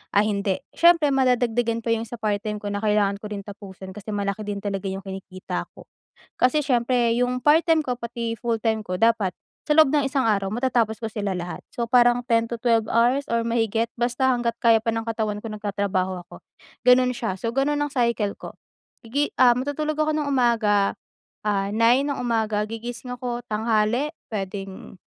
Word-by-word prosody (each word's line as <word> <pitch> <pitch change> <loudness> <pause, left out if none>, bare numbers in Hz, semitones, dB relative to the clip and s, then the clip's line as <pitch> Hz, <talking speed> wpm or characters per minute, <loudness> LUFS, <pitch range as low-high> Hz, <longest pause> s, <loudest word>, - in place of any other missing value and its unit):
ay 205 +1 +4
hindi. 200 -2 -1
Siyempre 335 -4 +5
madadagdagan 245 -3 +1
pa 230 - +2
yung 225 0 -1
sa 240 - -6
part-time 210 0 -2
ko 205 - -6
na 205 - -3
kailangan 210 -2 +1
ko 210 - -7
rin 200 -1 -5
tapusin 195 -2 -10
kasi 210 +1 -9
malaki 200 0 -2
din 205 -1 -4
talaga 200 -1 -3
yung 190 0 -5
kinikita 190 -1 -6
ko. - - -12 0.5
Kasi 255 +5 +3
siyempre 245 -3 +1
yung 250 +1 0
part-time 320 +2 +4
ko 250 -4 -3
pati 235 -1 -4
full-time 225 -2 0
ko 180 - -3
dapat 225 -5 +3 0.3
sa - - -3
loob 315 -3 +7
ng 290 - +3
isang 270 -3 0
araw 200 -3 +1
matatapos 235 -3 0
ko 225 - -3
sila 210 -2 -3
lahat 180 -1 -5
so, 235 -1 -3
parang 240 0 +5
10 230 0 +1
to 235 - -3
12 230 -1 +2
hours 245 +4 +3
or 230 0 0
mahigit 225 -1 +1
basta 245 +2 0
hangga't 235 -1 -2
kaya 225 -2 +4
pa 230 - +1
ng 225 0 -3
katawan 220 -2 -2
ko 225 - -7
nagtatrabaho 200 -3 -2
ako, - - -14 0.4
gano'n 250 0 +5
siya. 225 -7 -3
So, 230 - -2
gano'n 290 +2 +1
ang 290 - 0
cycle 235 -6 0
ko. - - -8 0.6
Igi 285 +5 0
ah 255 -1 +7
matutulog 290 +4 -2
ako 310 0 +1
ng 300 -1 -1
umaga, 225 -6 +2 0.5
ah, 200 -2 0
9 235 +5 +4
ng 285 -1 -2
umaga 220 -3 0
gigising 240 +2 -6
ako 240 -1 -4
tanghali 220 +5 +1 0.2
puwedeng, 195 -2 -6
230 Hz, 185 wpm, -24 LUFS, 210-250 Hz, 0.6 s, loob